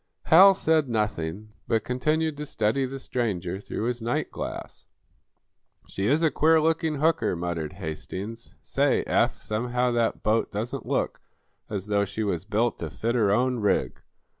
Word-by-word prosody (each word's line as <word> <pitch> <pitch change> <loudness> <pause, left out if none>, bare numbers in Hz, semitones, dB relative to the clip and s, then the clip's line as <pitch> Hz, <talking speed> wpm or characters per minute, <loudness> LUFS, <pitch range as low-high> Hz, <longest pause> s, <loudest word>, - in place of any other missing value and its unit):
Hal 190 +4 +8
said 160 -6 +2
nothing, 105 -2 -2
but 110 -2 +1
continued 155 +5 0
to 150 - -4
study 115 +3 0
the 135 +1 -6
stranger 95 -9 -2
through 105 - -5
his 120 0 -2
night 120 +2 -1
glass. - - -7 1.0
"She 95 +1 -2
is 150 +7 +2
a 160 - +4
queer 160 +1 +4
looking 160 0 +1
hooker," 160 - +1
muttered 85 -2 -3
Hastings. 95 +6 -7
"Say, - - +1
Eph, - - +1
somehow 125 +3 0
that 120 -1 0
boat 110 +1 +1
doesn't 110 +4 -4
look - - -1 0.5
as 100 -3 -3
though 105 -1 +1
she 100 +3 -4
was 90 -4 -2
built 110 +3 0
to 80 - -4
fit 115 +9 -2
her 110 -5 +2
own 125 +4 +2
rig." 105 -2 0
115 Hz, 160 wpm, -26 LUFS, 100-135 Hz, 1.0 s, Hal